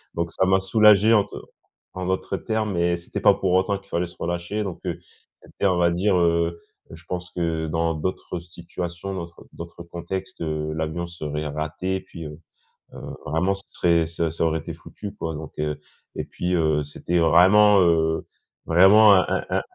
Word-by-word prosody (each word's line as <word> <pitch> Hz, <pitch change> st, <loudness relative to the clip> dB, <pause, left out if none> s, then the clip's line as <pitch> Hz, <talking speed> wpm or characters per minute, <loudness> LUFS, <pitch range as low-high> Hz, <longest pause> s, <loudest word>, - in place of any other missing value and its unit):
Donc 85 Hz, 0 st, -2 dB
ça 95 Hz, -, +1 dB
m'a 95 Hz, +1 st, +3 dB
soulagé 105 Hz, +2 st, +5 dB
en 105 Hz, -3 st, +5 dB
te -, -, -12 dB, 0.6 s
en 95 Hz, 0 st, -4 dB
d'autres 95 Hz, +1 st, -1 dB
termes 110 Hz, -2 st, -2 dB
et 85 Hz, 0 st, +1 dB
c'était 85 Hz, -, -6 dB
pas -, -, +6 dB
pour 95 Hz, -2 st, -1 dB
autant 95 Hz, +2 st, +2 dB
qu'il 100 Hz, -, -22 dB
fallait 90 Hz, -1 st, -1 dB
se 85 Hz, -, -13 dB
relâcher 85 Hz, +5 st, -3 dB
donc 95 Hz, -4 st, -5 dB
heu, -, -, -3 dB, 0.4 s
c'était -, -, -3 dB
on 90 Hz, -2 st, +2 dB
va 85 Hz, 0 st, +3 dB
dire, 95 Hz, +3 st, +1 dB
heu 85 Hz, -1 st, +1 dB, 0.3 s
heu, -, -, -10 dB
je 80 Hz, -, -16 dB
pense 90 Hz, 0 st, -4 dB
que 80 Hz, -2 st, -2 dB
dans 80 Hz, +1 st, 0 dB
d'autres 90 Hz, +2 st, -4 dB
situations, 85 Hz, +2 st, -7 dB
d'autr 85 Hz, -2 st, -8 dB
d'autres 85 Hz, 0 st, -9 dB
contextes, 85 Hz, +3 st, -6 dB
heu, 75 Hz, -1 st, -2 dB
l'avion 80 Hz, +2 st, -3 dB
serait 75 Hz, -3 st, -5 dB
raté. 80 Hz, +6 st, -3 dB
Puis, 85 Hz, -3 st, -10 dB
heu 75 Hz, 0 st, -9 dB, 0.6 s
heu, -, -, -9 dB, 0.3 s
vraiment, 90 Hz, +6 st, 0 dB
c'est 100 Hz, 0 st, -13 dB
très 85 Hz, -2 st, +2 dB
ça 85 Hz, 0 st, -2 dB
ça 85 Hz, -, -2 dB
aurait 80 Hz, 0 st, 0 dB
été -, -, -7 dB
foutu 105 Hz, -1 st, -9 dB
quoi, 80 Hz, -1 st, -4 dB
donc 80 Hz, +1 st, -8 dB
heu, 75 Hz, 0 st, -2 dB, 0.4 s
et -, -, -3 dB
puis, 90 Hz, +1 st, -3 dB
heu, 80 Hz, -3 st, +1 dB
c'était 85 Hz, +4 st, -2 dB
vraiment, 95 Hz, +6 st, +6 dB
heu, 80 Hz, -2 st, +2 dB, 0.4 s
vraiment 100 Hz, +5 st, +7 dB
un 95 Hz, -, +4 dB
un -, -, 0 dB
un -, -, +1 dB
85 Hz, 190 wpm, -23 LUFS, 80-95 Hz, 0.6 s, vraiment